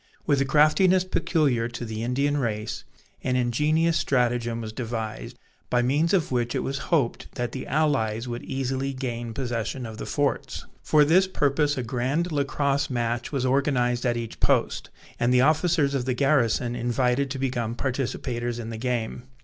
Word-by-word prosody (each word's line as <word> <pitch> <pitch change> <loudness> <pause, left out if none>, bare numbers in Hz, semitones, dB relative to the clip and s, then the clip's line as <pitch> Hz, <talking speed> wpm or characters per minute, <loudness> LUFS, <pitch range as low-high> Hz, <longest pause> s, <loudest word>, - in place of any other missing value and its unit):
With 145 -2 +2
the 135 - +2
craftiness 180 +6 +4
peculiar 145 -10 +1
to 120 0 -6
the 110 -1 -5
Indian 140 +5 0
race, 110 -5 -3 0.4
an 125 -1 0
ingenious 150 +7 +2
stratagem 120 -4 0
was 110 -1 -6
devised, 115 -2 -5 0.3
by 125 0 +2
means 145 +7 +2
of 180 -8 +1
which 120 -1 0
it - - 0
was 135 +1 -3
hoped 145 -9 0
that 120 0 -2
the 130 - -6
allies 130 -7 0
would 120 0 -4
easily 135 0 -2
gain 120 -3 -4
possession 120 0 -3
of 110 -1 -8
the - - -5
forts. 145 -1 -1 0.2
For 150 -1 +4
this 185 +5 +4
purpose 145 -4 +1
a 130 - -1
grand 130 +9 -1
Lacrosse 140 -1 0
match 120 -1 -2
was 135 -3 -1
organized 125 -2 +1
at 120 -2 +1
each 115 -1 -6
post, - - +1 0.3
and 120 +1 +2
the 125 0 +5
officers 155 0 +3
of 130 -3 -1
the 130 -1 0
garrison 125 -4 +2
invited 125 +3 0
to 135 - -4
become 120 -4 -2
participators 120 -2 -2
in 115 -1 -5
the 115 - -5
game. 120 0 -2
130 Hz, 170 wpm, -25 LUFS, 120-145 Hz, 0.4 s, the